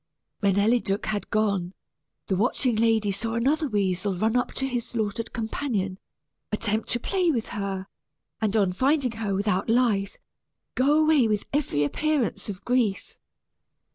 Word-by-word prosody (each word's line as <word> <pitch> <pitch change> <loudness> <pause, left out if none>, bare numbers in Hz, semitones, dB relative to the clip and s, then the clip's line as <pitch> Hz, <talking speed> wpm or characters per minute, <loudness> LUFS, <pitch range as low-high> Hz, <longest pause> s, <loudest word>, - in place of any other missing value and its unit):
When 200 -2 +2
Eliduc 205 -1 +2
had 210 -2 -3
gone, 200 -4 0 0.5
the 190 - 0
watching 240 +4 +1
lady 220 -2 +2
saw 225 +4 -2
another 290 +7 +1
weasel 195 -3 0
run 220 +5 0
up 250 - +1
to 265 - -2
his 245 -3 -1
slaughtered 220 0 -3
companion, 220 -5 -2 0.5
attempt 215 +1 0
to 240 - 0
play 365 +6 +1
with 235 -8 -1
her, 195 -2 -3 0.6
and 215 0 +1
on 195 -4 +2
finding 265 +4 +2
her 215 -3 -2
without 200 0 0
life, 225 -5 +2 0.6
go 285 +4 +3
away 310 -6 +4
with 210 -2 -1
every 255 - +1
appearance 290 - -1
of 195 -1 -7
grief. 240 -6 0
220 Hz, 145 wpm, -26 LUFS, 200-250 Hz, 0.6 s, away